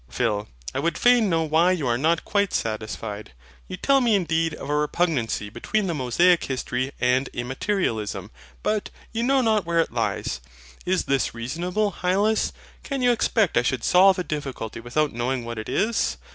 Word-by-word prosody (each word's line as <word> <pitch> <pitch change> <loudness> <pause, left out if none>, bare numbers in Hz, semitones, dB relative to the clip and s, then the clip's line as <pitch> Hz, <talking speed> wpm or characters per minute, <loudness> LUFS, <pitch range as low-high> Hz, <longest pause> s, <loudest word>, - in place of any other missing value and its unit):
PHIL. 105 - -1 0.3
I 135 - -1
would 170 +4 0
fain 245 -4 +4
know 165 -2 +2
why 160 +4 +3
you 165 -6 -2
are 120 -1 +2
not 160 +6 +1
quite 200 -2 +1
satisfied. 105 -5 -4 0.3
You - - -6
tell 275 -1 +3
me 235 -4 +3
indeed 165 -4 0
of - - -8
a 145 - 0
repugnancy 150 -8 0
between 215 - -1
the 175 - -1
Mosaic 165 +6 +3
history 130 0 -2
and 125 +2 +2
Immaterialism: 120 - -2 0.3
but 210 -1 0 0.2
you 230 - -2
know 265 +2 +3
not 220 -4 +2
where 170 0 0
it 165 - +1
lies. - - -2 0.5
Is 185 0 +2
this 135 -3 0
reasonable, 175 - -2
Hylas? 200 +5 +2 0.3
Can 275 -2 -3
you 245 - +5
expect 220 -4 +1
I - - +5
should 125 -1 -1
solve 190 +1 +5
a 180 - -1
difficulty 135 -9 -5
without 140 +6 -1
knowing 120 +1 -2
what 115 -1 -5
it 110 - -6
is? 225 +2 0
160 Hz, 175 wpm, -24 LUFS, 120-195 Hz, 0.5 s, you